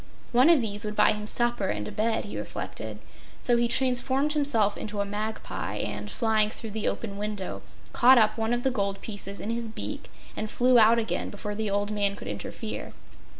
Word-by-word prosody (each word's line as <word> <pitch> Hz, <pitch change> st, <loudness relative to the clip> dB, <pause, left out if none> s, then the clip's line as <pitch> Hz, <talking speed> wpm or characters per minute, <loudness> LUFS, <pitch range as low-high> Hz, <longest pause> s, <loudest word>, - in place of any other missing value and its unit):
One 255 Hz, +6 st, +5 dB
of 330 Hz, -6 st, +6 dB
these 205 Hz, -2 st, -1 dB
would 210 Hz, 0 st, -4 dB
buy -, -, +5 dB
him 210 Hz, 0 st, -4 dB
supper 240 Hz, -4 st, +3 dB
and 105 Hz, -, -2 dB
a -, -, -6 dB
bed, 225 Hz, +1 st, 0 dB
he 205 Hz, -, -7 dB
reflected, -, -, -4 dB, 0.5 s
so 245 Hz, -, +3 dB
he 235 Hz, 0 st, +2 dB
transformed 260 Hz, +4 st, +1 dB
himself 250 Hz, -9 st, +3 dB
into 210 Hz, -1 st, -5 dB
a 200 Hz, -, +1 dB
magpie 210 Hz, +2 st, -4 dB
and, -, -, -4 dB
flying 220 Hz, -3 st, +1 dB
through 220 Hz, 0 st, -7 dB
the 220 Hz, +1 st, -2 dB
open 200 Hz, -3 st, -3 dB
window, 210 Hz, -2 st, -4 dB, 0.3 s
caught 255 Hz, +2 st, +7 dB
up 215 Hz, -2 st, +4 dB
one 225 Hz, 0 st, -1 dB
of 240 Hz, 0 st, 0 dB
the 265 Hz, -, +2 dB
gold 200 Hz, -4 st, -1 dB
pieces 200 Hz, -2 st, -5 dB
in 220 Hz, -, -3 dB
his 230 Hz, -1 st, -2 dB
beak 220 Hz, -, -6 dB, 0.3 s
and 215 Hz, -, -4 dB
flew 250 Hz, +2 st, +4 dB
out 225 Hz, +1 st, +6 dB
again 225 Hz, -1 st, -1 dB
before 210 Hz, 0 st, -5 dB
the 215 Hz, 0 st, -2 dB
old 205 Hz, +1 st, -1 dB
man 200 Hz, -1 st, 0 dB
could -, -, -9 dB
interfere. -, -, -6 dB
220 Hz, 200 wpm, -27 LUFS, 205-240 Hz, 0.5 s, caught